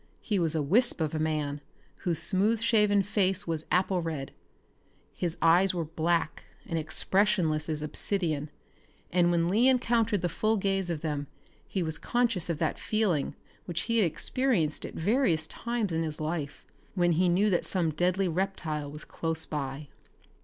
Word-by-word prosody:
He 205 -4 0
was 165 -2 +3
a 155 - +1
wisp 225 - +2
of 155 -1 -1
a 155 - -1
man 150 -2 -1 0.4
whose 170 -3 -2
smooth 210 +6 +3
shaven 210 -3 +3
face 195 0 +1
was 160 -2 -3
apple 185 0 +2
red. 155 -5 -4 0.8
His 170 -2 -3
eyes 180 +3 +5
were 170 -2 -1
black 165 +1 -1 0.2
and 165 - -2
expressionless 160 -1 +1
as 155 -1 -2
obsidian, 155 -1 -2 0.6
and 175 0 +3
when 170 -1 +2
Lee 220 +8 +3
encountered 230 -5 +2
the 175 - +1
full 215 +6 0
gaze 195 -2 0
of 165 -3 -3
them 145 -3 -3 0.4
he 190 - -2
was 160 -1 -2
conscious 235 -8 0
of 165 - -1
that - - -1
feeling 205 -10 0 0.3
which 170 -2 -2
he 230 - 0
had 210 - +4
experienced 165 - 0
at - - -11
various 180 - +1
times 235 +1 -3
in 165 0 0
his 155 -2 -3
life 155 -2 -4 0.3
when 175 -2 +3
he 175 +2 +3
knew 200 +4 +3
that 175 - +1
some 175 -4 +1
deadly 180 +4 +1
reptile 165 -5 -2
was 150 +1 -8
close 165 -1 -3
by. 145 -1 -4
175 Hz, 165 wpm, -28 LUFS, 155-200 Hz, 0.8 s, eyes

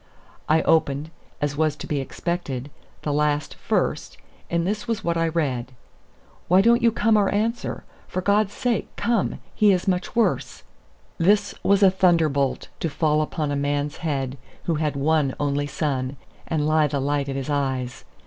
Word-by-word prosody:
I 160 +1 +4
opened, 150 -1 +1 0.3
as 145 -1 0
was 155 -1 +1
to - - -8
be 145 - -1
expected, 140 -2 -4 0.3
the 150 - -1
last 150 0 0
first, - - -1 0.3
and 170 0 0
this 210 +5 -2
was 225 -2 -2
what 170 0 0
I 165 0 +1
read: 135 -7 -1 0.7
"Why 180 +2 +5
don't 235 +4 +5
you 235 - +4
come 220 0 +3
or 200 -2 +3
answer? 225 +4 -1 0.2
For 185 - -3
God's 200 +2 +2
sake, 240 +2 -1
come. 235 -4 0 0.2
He 210 -1 +4
is 185 0 0
much 185 +4 -1
worse." 235 - 0 0.6
This 200 +5 +3
was 200 +1 +3
a 190 - +7
thunderbolt 160 -8 +2
to 165 - -1
fall 155 0 +1
upon 155 -1 -2
a - - 0
man's 145 +1 -1
head 135 -5 -3 0.2
who 170 - 0
had 150 -2 0
one 145 -1 +1
only 145 0 0
son, 135 -2 -2 0.3
and 160 -2 0
he 155 0 +3
the 140 0 -2
light 140 0 0
of 135 - -3
his 135 +2 -3
eyes! 130 -3 -2
155 Hz, 170 wpm, -24 LUFS, 145-185 Hz, 0.7 s, a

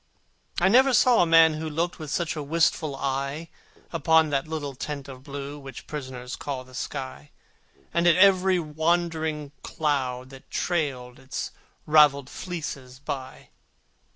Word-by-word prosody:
I 180 - +4
never 255 +5 +5
saw 245 -1 +5
a 175 - +3
man 165 -1 +6
who 155 +1 -4
looked 170 +4 -2
With 155 -2 -6
such 170 +3 -1
a 155 - -3
wistful 155 -1 +1
eye 140 +4 -3 0.4
Upon 160 -2 +3
that 140 +1 0
little 150 -3 -4
tent 140 +1 -6
of 130 -2 -10
blue 140 +1 -7
Which 135 -1 -10
prisoners 130 -4 -6
call 135 -3 -5
the 130 0 -18
sky, 130 - -6 0.6
And 170 +1 +2
at 170 - +6
every 190 -1 +5
wandering 160 -2 -1
cloud 130 -4 -2
that 135 -1 -14
trailed 135 -8 -2
Its 135 0 -5 0.3
ravelled 145 -3 +5
fleeces 140 -8 -6
by. 135 -2 -7
150 Hz, 145 wpm, -26 LUFS, 135-165 Hz, 0.6 s, man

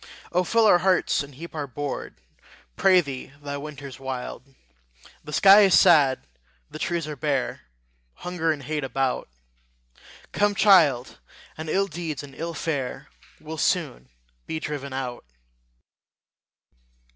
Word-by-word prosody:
O 180 +1 +2
fill 230 +4 +2
our 180 -4 +6
hearts, 185 0 +2
and 140 -1 -9
heap 165 +5 -10
our 150 -3 -4
board, 145 +2 -5 0.6
Pray 185 -2 +5
thee 135 -3 -8
the 145 -1 -5
winter's 140 -2 -9
wild! 130 -2 -5 0.8
The 150 - -9
sky 195 +6 +7
is 195 -3 +6
sad, 150 -7 +4 0.5
the - - -8
trees 170 -3 -2
are 150 - -5
bare, 140 -2 -2 0.5
Hunger 175 -2 -2
and 145 -3 -4
hate 150 +2 -3
about: 135 - -2 1.0
Come, 205 0 +1
child, 160 - +4 0.4
and 155 0 -7
ill 195 +4 +2
deeds 160 -6 -5
and 140 -1 -11
ill 165 +3 -5
fare 140 -4 -4 0.3
Will 155 0 -8
soon 65 - -1 0.4
be 160 - -3
driven 145 -3 -5
out. 130 -2 -5
150 Hz, 135 wpm, -25 LUFS, 135-175 Hz, 1.0 s, sky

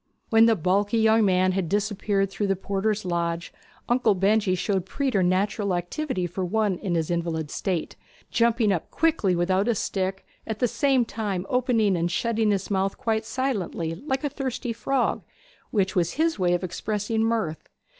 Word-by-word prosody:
When 225 0 +6
the 225 - +4
bulky 200 +5 +1
young 220 0 +4
man 185 -1 +3
had 185 -3 -1
disappeared 205 -1 0
through 205 +1 -1
the 195 - +2
porter's 200 +2 -1
lodge, 170 -1 -2 0.3
Uncle 240 -4 +3
Benjy 195 0 +2
showed 190 +1 -1
preternatural 200 -5 0
activity 185 - -2
for 175 +2 -3
one 200 0 0
in 185 -5 -2
his 165 0 -1
invalid 165 -3 -2
state, 180 -5 -2 0.4
jumping 230 -2 +3
up 175 -4 -2
quickly 305 - +1
without 185 +4 +1
his 235 -3 +1
stick, 190 0 -2 0.2
at 220 - -3
the 245 - +2
same 265 0 +2
time 205 -5 -3
opening 235 -6 +2
and 170 0 0
shutting 225 +3 0
his 200 0 -1
mouth 195 0 0
quite 220 -1 -1
silently 220 -10 -2
like 265 - -3
a 290 - 0
thirsty 260 -3 -3
frog, 255 +3 0 0.5
which 195 -4 0
was 175 -2 +1
his 320 -3 0
way 175 -1 +3
of 175 - -3
expressing 210 +4 -2
mirth. 220 -9 -1
200 Hz, 165 wpm, -25 LUFS, 185-225 Hz, 0.5 s, When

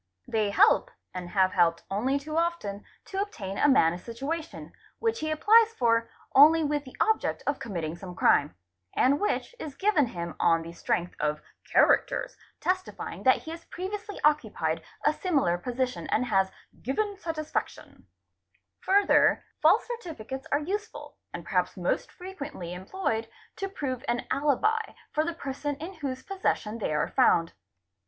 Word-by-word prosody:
They 215 -2 +1
help—and.have 190 - +2
helped 170 -3 +2
only 250 +8 +1
too 305 +2 -6
often—to 335 - -3
obtain 200 - -5
a 290 - +5
man 165 -11 +5
a 175 - -6
situation, 275 - -5 0.3
which 460 0 0
he 310 0 -2
apples 440 +8 +5
for 230 -1 +2 0.2
only 315 +4 +7
with 295 -1 -1
the 260 - -12
object 440 0 +1
of 285 -1 -1
committing 170 -7 -4
some 180 0 -9
crime, 145 - +3 0.4
and 280 +3 +3
which 415 - -1
is 290 -3 -6
given 385 -10 +2
him 170 -6 -5
on 165 -1 +3
the 165 +1 -9
strength 175 +1 -1
of 150 0 -1 0.3
'characters', - - +3 0.2
testifying 370 +1 -3
that 260 - +4
he 320 - -7
has 330 0 -9
previously 405 +3 -6
occupied 300 0 +1 0.2
a 300 - +5
similar 295 - +1
position 250 +4 -2
and 250 - +1
has 195 -5 +2 0.2
" - - -26
given 405 - -1
satisfaction"'. 315 -4 -5 0.4
} - - -44
Further, 400 +1 +4 0.2
false - - +5
certificates 305 - -6
are 285 - +4
useful, 415 +7 -5
and - - -6
perhaps - - 0
most - - -1
frequently 300 - -7
i - - -6
employed, 225 - -2 0.3
to 390 -1 -3
prove 260 -8 -4
an 240 0 -1
alibi 300 - +2 0.3
for 305 - +1
the 340 +1 -3
person 285 -1 -4
in 330 +7 -7
whose 275 -6 -5
possession 230 - -2
they 205 - -2
are; 150 0 +1
found. 165 0 +3
280 Hz, 155 wpm, -28 LUFS, -, 0.4 s, only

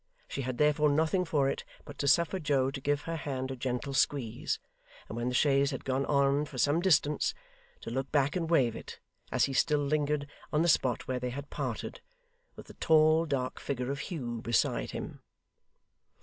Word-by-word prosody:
She - - -4
had 130 -1 -3
therefore 150 0 +3
nothing 160 +5 +2
for 145 -5 +1
it 135 - -2 0.2
but 145 - -11
to 140 - 0
suffer 170 +6 +3
Joe 140 -4 +1
to 135 - -6
give 145 +1 0
her 165 0 -3
hand 135 -3 -3
a - - -4
gentle 130 +2 -3
squeeze, 135 -5 0 0.5
and - - -7
when 120 +1 -2
the 125 - -2
chaise 140 0 +3
had 135 - -5
gone 135 +1 0
on 140 +1 +2
for 140 - -10
some 145 +5 +3
distance, 150 -5 +2 0.5
to - - -6
look 135 +2 -3
back 145 -1 +2
and 165 -3 -1
wave 125 -9 +3
it, - - -9 0.3
as - - +3
he 135 - -4
still 145 +1 +2
lingered 150 0 0 0.2
on 150 +2 +2
the - - +2
spot 130 -6 +2
where 130 -1 -1
they 125 0 -3
had 140 +3 -7
parted, - - -4 0.5
with - - -11
the - - -13
tall 160 0 +4
dark 130 -3 -2
figure 130 -1 -3
of 140 - -4
Hugh 120 - -4
beside 115 0 +1
him. - - -7
140 Hz, 195 wpm, -30 LUFS, 130-150 Hz, 0.5 s, tall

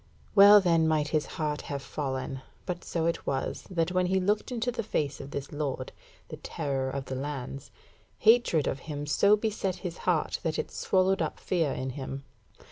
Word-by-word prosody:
Well 205 +1 +9
then 165 -4 +3
might 155 -2 +1
his 155 -1 0
heart 150 -2 -1
have 140 -1 -3
fallen, 135 -1 -4 0.2
but 180 -1 -4
so 165 -2 -2
it 170 - -1
was, 135 -1 -2
that 170 -2 0
when 180 0 +2
he 190 +1 +2
looked 205 +6 0
into 245 0 -1
the 240 - -3
face 150 -10 -2
of 135 - -8
this 140 -1 -5
Lord, 140 -3 -3 0.4
the - - -7
terror 135 -2 -2
of 135 0 -4
the 130 - -5
lands, 135 0 -5 0.5
hatred 220 - +4
of 135 - -1
him 145 -1 -3
so 200 +8 +4
beset 205 -4 -1
his 170 -1 -4
heart 165 -4 +1
that 160 -2 -1
it - - -3
swallowed 190 +1 +2
up - - -2
fear 165 -6 0
in 130 0 -3
him. 135 0 -6
155 Hz, 190 wpm, -29 LUFS, 140-185 Hz, 0.5 s, Well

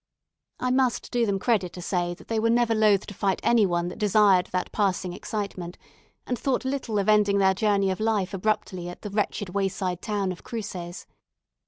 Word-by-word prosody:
I 250 - 0
must 255 -2 +1
do 240 -2 +1
them 200 -1 +1
credit 195 -4 0
to 180 - -8
say, 175 -1 -1
that - - -17
they 225 -1 0
were 230 +1 +2
never 235 0 +3
loath 215 -3 +3
to 205 - -8
fight 195 0 0
any 230 -4 +4
one 175 -1 0
that - - -9
desired 205 -3 +4
that 185 0 -3
passing 190 -3 0
excitement, 190 -3 -5 0.5
and 245 - -2
thought 265 -1 0
little 260 -5 -2
of 200 - 0
ending 210 -2 +4
their 190 -1 +4
journey 200 -1 +2
of 185 - -4
life 215 -3 0
abruptly 185 -3 -2
at 175 - -10
the 210 - -5
wretched 205 -1 -1
wayside 185 -2 -2
town 200 -3 -1
of 180 - -9
Cruces. 190 -7 -6
200 Hz, 195 wpm, -26 LUFS, 185-220 Hz, 0.5 s, any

